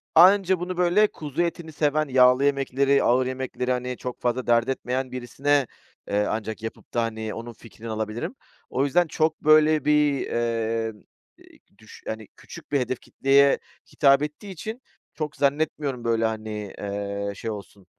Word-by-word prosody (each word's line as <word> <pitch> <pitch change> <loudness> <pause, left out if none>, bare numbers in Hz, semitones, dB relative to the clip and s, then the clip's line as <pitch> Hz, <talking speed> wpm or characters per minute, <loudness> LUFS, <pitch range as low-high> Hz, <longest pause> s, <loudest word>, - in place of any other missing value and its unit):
Anca 190 +1 +6
bunu, 180 0 -4
böyle, 180 +4 +4
kuzu 150 -3 -4
etini 170 -1 -3
seven, 150 0 +1
yağlı 125 +1 +5
yemekleri, 140 0 +2
ağır 125 +2 +3
yemekleri, 130 -1 -3
hani, 125 0 -2
çok 125 -1 -6
fazla 125 +1 -1
dert 120 +1 +3
etmeyen 130 0 -2
birisine, 135 +2 0 0.4
eee, 105 +1 +1
ancak 110 0 -4
yapıp 110 - -8
da, 120 - +1
hani, 110 -1 -4
onun 115 +1 -7
fikrini 115 0 -11
alabilirim. 110 - -4 0.3
O 135 +2 0
yüzden 170 +5 +2
çok, 155 0 0
böyle, 155 -1 +5
bir, 150 -2 +3
eee, 115 -1 -1 0.8
düş - - -15
hani, 110 -1 -5
küçük - - -13
bir 140 - +2
hedef 125 0 -2
kitleye 140 +1 +3 0.3
hitap 140 -1 +5
ettiği 150 +7 -6
için 220 +8 -7 0.3
çok 150 -1 -4
zannetmiyorum, 140 -3 0
böyle, 115 -1 +1
hani, 110 -2 -4
ııı, 100 0 -4
şey 115 - -4
olsun 100 -2 -10
130 Hz, 155 wpm, -25 LUFS, 115-150 Hz, 0.8 s, Anca